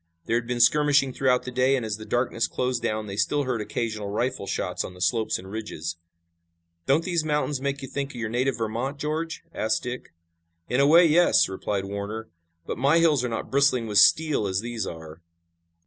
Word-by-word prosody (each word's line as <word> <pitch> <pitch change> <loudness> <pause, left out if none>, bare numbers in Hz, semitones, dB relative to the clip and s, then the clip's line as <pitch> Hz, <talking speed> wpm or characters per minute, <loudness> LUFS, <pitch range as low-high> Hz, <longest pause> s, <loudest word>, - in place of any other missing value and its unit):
There 115 - 0
had 115 0 -4
been 120 0 -2
skirmishing 145 +1 +4
throughout 125 -2 +2
the 125 - -6
day, 130 +2 +2
and 125 -4 -2
as 105 -1 -3
the 110 - -9
darkness 120 -1 0
closed 125 -1 -2
down 110 0 -2
they 100 -1 -6
still 145 +7 +1
heard 125 -4 -2
occasional 110 -1 -3
rifle 120 0 -2
shots 90 -1 -2
on 90 - -8
the - - -14
slopes 110 +5 0
and 95 - -11
ridges. 85 -6 -5 0.9
"Don't 145 +5 +3
these 170 -3 0
mountains 150 -2 -1
make 140 0 -3
you - - -5
think 140 +1 -4
of 140 - -12
your 120 -2 -3
native 125 +2 0
Vermont, 115 +5 -3
George?" 155 +3 -3
asked 110 - -1
Dick. 125 0 -6 0.6
"In 125 - 0
a 140 - +5
way, 170 +4 +7
yes," 170 +2 +4
replied 95 +1 -3
Warner, 100 +3 -5 0.4
"but - - -5
my 140 +5 +4
hills 155 -6 +3
are 125 - -1
not 115 - -5
bristling 135 -3 +3
with 105 -2 +3
steel 145 +1 +4
as 95 0 -1
these 115 -3 -4
are." 80 0 -9
125 Hz, 205 wpm, -25 LUFS, 110-140 Hz, 0.9 s, way